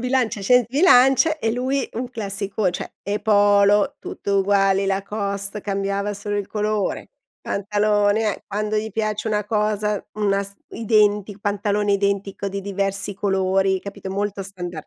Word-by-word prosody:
Bilancia, 250 Hz, -4 st, 0 dB
ascendente 240 Hz, +3 st, +3 dB
Bilanc 295 Hz, -1 st, +5 dB
e 225 Hz, -, 0 dB
lui 260 Hz, +3 st, -1 dB
un 245 Hz, +2 st, -4 dB
classico, 200 Hz, -3 st, -2 dB
cioè 180 Hz, -, -6 dB
le 205 Hz, +1 st, -2 dB
polo, 205 Hz, -1 st, +4 dB
tutte -, -, -6 dB
uguali, 195 Hz, 0 st, +2 dB
Lacoste, 200 Hz, +1 st, -2 dB
cambiava 200 Hz, 0 st, -2 dB
solo 205 Hz, +1 st, -4 dB
il 205 Hz, -1 st, -2 dB
colore, 210 Hz, -1 st, -2 dB, 0.3 s
pantalone, 205 Hz, +1 st, +1 dB
eh. -, -, -20 dB
Quando 210 Hz, +1 st, -2 dB
gli 220 Hz, +1 st, -2 dB
piace 215 Hz, +1 st, -2 dB
una 210 Hz, -1 st, 0 dB
cosa, 210 Hz, 0 st, 0 dB, 0.2 s
n 215 Hz, -, -7 dB
una 200 Hz, -1 st, +2 dB
s 200 Hz, 0 st, -6 dB, 0.2 s
identic 210 Hz, -2 st, +1 dB
pantalone 205 Hz, 0 st, 0 dB
identico 200 Hz, 0 st, -1 dB
di 195 Hz, +1 st, -4 dB
diversi 195 Hz, 0 st, -2 dB
colori, 190 Hz, -1 st, +1 dB
capito, 200 Hz, -1 st, -8 dB
molto 200 Hz, 0 st, -2 dB
standard. 175 Hz, -4 st, -7 dB
205 Hz, 145 wpm, -22 LUFS, 195-215 Hz, 0.3 s, Bilanc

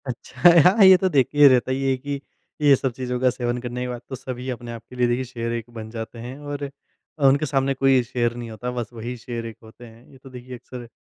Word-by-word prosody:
अच्छा 125 Hz, +4 st, +2 dB, 0.3 s
हाँ, 220 Hz, -, +5 dB
ये 190 Hz, -1 st, +9 dB
तो 190 Hz, +1 st, 0 dB
देखिए 145 Hz, -1 st, +5 dB
रहता 130 Hz, -1 st, +3 dB
है 135 Hz, 0 st, 0 dB
कि 140 Hz, +2 st, -5 dB, 0.4 s
ये 145 Hz, -2 st, +6 dB
सब 130 Hz, 0 st, -2 dB
चीज़ों 125 Hz, 0 st, -4 dB
का 130 Hz, 0 st, +3 dB
सेवन 120 Hz, -1 st, -2 dB
करने 125 Hz, 0 st, -5 dB
के 125 Hz, -, -2 dB
बाद 120 Hz, -1 st, -6 dB
तो 130 Hz, -, -4 dB
सभी 130 Hz, 0 st, -6 dB
अपने 120 Hz, -1 st, -6 dB
आप 115 Hz, -1 st, -8 dB
के 125 Hz, -, -12 dB
लिए 125 Hz, -1 st, +2 dB
देखिए 120 Hz, +2 st, 0 dB
शेर 115 Hz, -2 st, -5 dB
एक 115 Hz, 0 st, -5 dB
बन 110 Hz, -1 st, -8 dB
जाते 115 Hz, +1 st, -7 dB
हैं 125 Hz, +3 st, -8 dB
और 145 Hz, -1 st, -5 dB, 0.6 s
उनके 140 Hz, +3 st, +3 dB
सामने 135 Hz, -1 st, 0 dB
कोई 135 Hz, -1 st, +3 dB
शेर 120 Hz, -1 st, -1 dB
नहीं 120 Hz, -1 st, -7 dB
होता। 125 Hz, +3 st, -5 dB
बस 120 Hz, -3 st, -4 dB
वही 120 Hz, +2 st, -6 dB
शेर 115 Hz, 0 st, -6 dB
एक 115 Hz, -1 st, -7 dB
होते 110 Hz, +2 st, -14 dB
हैं, 115 Hz, +1 st, -16 dB
ये 135 Hz, -, -16 dB
तो 130 Hz, +1 st, -14 dB
देखिए 125 Hz, 0 st, -9 dB
अक़्सर 125 Hz, 0 st, -10 dB
125 Hz, 245 wpm, -23 LUFS, 120-135 Hz, 0.6 s, ये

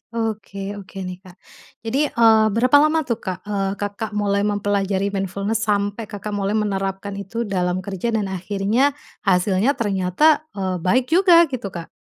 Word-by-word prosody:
Oke 220 Hz, -3 st, -3 dB, 0.2 s
oke 195 Hz, 0 st, -14 dB
nih 180 Hz, 0 st, -6 dB
Kak 185 Hz, -2 st, -15 dB, 0.5 s
jadi, 265 Hz, +7 st, +1 dB
eee, 225 Hz, -3 st, +4 dB
berapa 255 Hz, +5 st, +5 dB
lama 310 Hz, +2 st, +3 dB
tuh 235 Hz, -5 st, -2 dB
Kak, 185 Hz, -1 st, -5 dB
eee, 200 Hz, -2 st, -2 dB
Kakak 205 Hz, +2 st, -4 dB
mulai 200 Hz, -1 st, +1 dB
mempelajari 200 Hz, -1 st, 0 dB
mindfulness 200 Hz, +2 st, -2 dB
sampai 205 Hz, +1 st, -1 dB
Kakak 210 Hz, 0 st, -6 dB
mulai 205 Hz, 0 st, -1 dB
menerapkan 195 Hz, -1 st, -2 dB
itu 230 Hz, +4 st, -4 dB
dalam 185 Hz, -3 st, -1 dB
kerja 195 Hz, +3 st, -4 dB
dan 200 Hz, -3 st, -1 dB
akhirnya, 205 Hz, +9 st, 0 dB, 0.3 s
hasilnya 190 Hz, +7 st, +2 dB
ternyata, 205 Hz, -, +2 dB
eee, 190 Hz, -2 st, -2 dB
baik 240 Hz, +9 st, +2 dB
juga? 345 Hz, -1 st, +6 dB
Gitu 250 Hz, -5 st, -4 dB
Kak. 170 Hz, -3 st, -8 dB
205 Hz, 155 wpm, -21 LUFS, 195-225 Hz, 0.5 s, juga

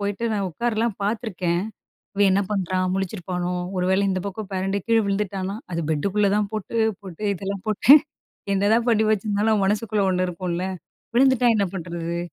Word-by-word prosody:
போயிட்டு 205 Hz, +3 st, -2 dB
நான் 200 Hz, -2 st, -1 dB
உட்காரல்லாம் 230 Hz, +2 st, -1 dB
பார்த்துருக்கேன். 195 Hz, -5 st, -1 dB, 0.5 s
இவன் 200 Hz, 0 st, +4 dB
என்ன 195 Hz, -, +3 dB
பண்றான்? 185 Hz, -2 st, 0 dB
முழிச்சிருப்பானோ? 180 Hz, -2 st, -3 dB, 0.2 s
ஒரு 180 Hz, -, 0 dB
வேளை 190 Hz, +1 st, +3 dB
இந்த 185 Hz, -1 st, 0 dB
பக்கம் 200 Hz, +1 st, -5 dB
பெரண்டு 195 Hz, +1 st, -1 dB
கீழ 230 Hz, -1 st, +3 dB
விழுந்துட்டான்னா 195 Hz, -1 st, -2 dB, 0.2 s
அது 170 Hz, -, -1 dB
பெட்டுக்குள்ள 200 Hz, +7 st, +1 dB
தான் 210 Hz, -1 st, 0 dB
போட்டு 215 Hz, +2 st, -4 dB, 0.3 s
போட்டு 185 Hz, 0 st, -10 dB
இதெல்லாம் 195 Hz, +1 st, -5 dB
போட்டேன். 260 Hz, +8 st, +7 dB, 0.5 s
என்னதான் 210 Hz, +4 st, +2 dB
பண்ணி 220 Hz, -2 st, +4 dB
வச்சிருந்தாலும், 210 Hz, +1 st, +1 dB
நம்ம 205 Hz, -2 st, +2 dB
மனசுக்குள்ள 210 Hz, 0 st, 0 dB
ஒண்ணு 185 Hz, 0 st, +1 dB
இருக்கும்ல்ல. 180 Hz, 0 st, -3 dB, 0.5 s
"விழுந்துட்டா 260 Hz, 0 st, +4 dB
என்ன 205 Hz, -2 st, +2 dB
பண்ணுறது?" 170 Hz, -1 st, -4 dB
200 Hz, 155 wpm, -23 LUFS, 185-215 Hz, 0.5 s, போட்டேன்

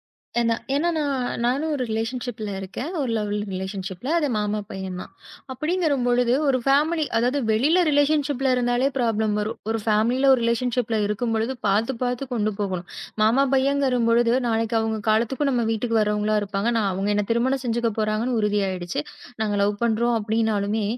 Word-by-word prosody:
ஏன்னா 230 Hz, -1 st, -1 dB, 0.2 s
ஏன்னா 325 Hz, +5 st, +1 dB, 0.6 s
நானும் 280 Hz, +6 st, 0 dB
ஒரு 260 Hz, -, -2 dB
ரிலேஷன்ஷிப்ல 225 Hz, -1 st, -3 dB
இருக்கேன். 195 Hz, -, -5 dB
ஒரு 260 Hz, -4 st, -1 dB
லவ் 210 Hz, -1 st, -2 dB, 0.2 s
ரிலேஷன்ஷிப்ல 190 Hz, +4 st, -5 dB
அது 295 Hz, -3 st, 0 dB
மாமா 210 Hz, 0 st, -1 dB
பையன் 190 Hz, -1 st, -5 dB
தான். -, -, -10 dB, 0.4 s
அப்படிங்கிற 315 Hz, +1 st, 0 dB
பொழுது 245 Hz, 0 st, +2 dB
ஒரு 260 Hz, -2 st, +3 dB
ஃபேமலி 305 Hz, +4 st, +2 dB
அதாவது 250 Hz, +5 st, +2 dB
வெளியில 295 Hz, +12 st, +3 dB
ரிலேஷன்ஷிப்ல 285 Hz, -2 st, +2 dB
இருந்தாலே 245 Hz, +2 st, +2 dB
ப்ராப்ளம் 220 Hz, -3 st, +1 dB
வரும். 215 Hz, +2 st, -3 dB
ஒரு 225 Hz, -, 0 dB
பேமலி 220 Hz, +4 st, +2 dB, 0.2 s
ரிலேஷன்ஷிப்ல 235 Hz, -1 st, 0 dB
இருக்கும்போது 225 Hz, +3 st, -1 dB
பாத்து 220 Hz, +6 st, +1 dB
பாத்து 250 Hz, +2 st, -1 dB
கொண்டு 215 Hz, -2 st, 0 dB
போகணும். 185 Hz, -3 st, -3 dB, 0.3 s
மாமா 235 Hz, +6 st, +4 dB
பையன்ங்கற 270 Hz, -2 st, +2 dB
பொழுது 235 Hz, +1 st, +3 dB
நாளைக்கு 225 Hz, 0 st, 0 dB
அவங்க 220 Hz, 0 st, -1 dB
காலத்துக்கும் 240 Hz, +6 st, +1 dB
நம்ம 240 Hz, -2 st, +1 dB
வீட்டுக்கு 225 Hz, +1 st, 0 dB
வர்றவங்களா 210 Hz, 0 st, +1 dB
இருப்பாங்க. 200 Hz, +1 st, -2 dB, 0.3 s
அவங்க 195 Hz, +2 st, -2 dB
என்னை 205 Hz, -1 st, 0 dB
திருமணம் 260 Hz, +3 st, +1 dB
செஞ்சுக்க 235 Hz, 0 st, 0 dB
போறாங்கன்னு 215 Hz, +3 st, 0 dB
உறுதி 210 Hz, 0 st, +1 dB
ஆயிடுச்சு. 175 Hz, -4 st, -3 dB, 0.4 s
நாங்க 210 Hz, -1 st, 0 dB
லவ் 205 Hz, +1 st, +2 dB
பண்றோம் 235 Hz, +1 st, +1 dB
அப்படின்னாலுமே, 215 Hz, -1 st, 0 dB
230 Hz, 150 wpm, -23 LUFS, 210-255 Hz, 0.6 s, மாமா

